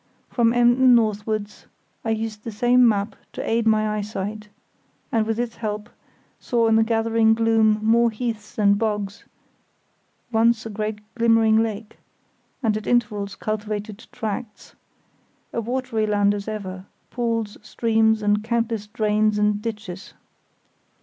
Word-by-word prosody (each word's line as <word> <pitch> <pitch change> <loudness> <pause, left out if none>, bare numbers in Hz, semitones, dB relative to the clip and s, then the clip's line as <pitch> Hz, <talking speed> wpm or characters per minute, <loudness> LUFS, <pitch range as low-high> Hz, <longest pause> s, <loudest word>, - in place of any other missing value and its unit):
From 230 -2 +2
Emden 245 +1 +5
northwards 215 -2 -1 0.4
I 225 - -3
used 220 -1 -3
the 230 - -5
same 245 +3 +4
map 205 0 -1 0.2
to - - -5
aid 230 0 +1
my 215 -1 +3
eyesight, 210 +1 -5 0.6
and 220 -2 +1
with 225 0 -1
its 240 -1 -3
help 210 0 -4 0.5
saw 235 -2 +1
in 225 - +4
the 225 - +5
gathering 225 0 +2
gloom 225 -1 +3
more 235 +1 +4
heaths 225 0 -5
and 200 -1 +3
bogs, 210 -2 -2 1.1
once 230 0 +2
a 225 - -5
great 210 0 -4
glimmering 225 -1 +4
lake, 220 -1 -5 0.6
and 220 -2 +2
at 215 - -5
intervals 210 -4 0
cultivated 215 0 -4
tracts; 220 -1 -6 0.8
a 235 - -1
watery 240 -2 -2
land 205 -1 +2
as 205 0 -5
ever; 190 -3 -5 0.3
pools, 230 -3 -2
streams 220 0 +1
and 210 0 +2
countless 230 -2 -1
drains 215 0 +1
and 210 0 +1
ditches. 210 -4 -7
220 Hz, 135 wpm, -23 LUFS, 210-230 Hz, 1.1 s, Emden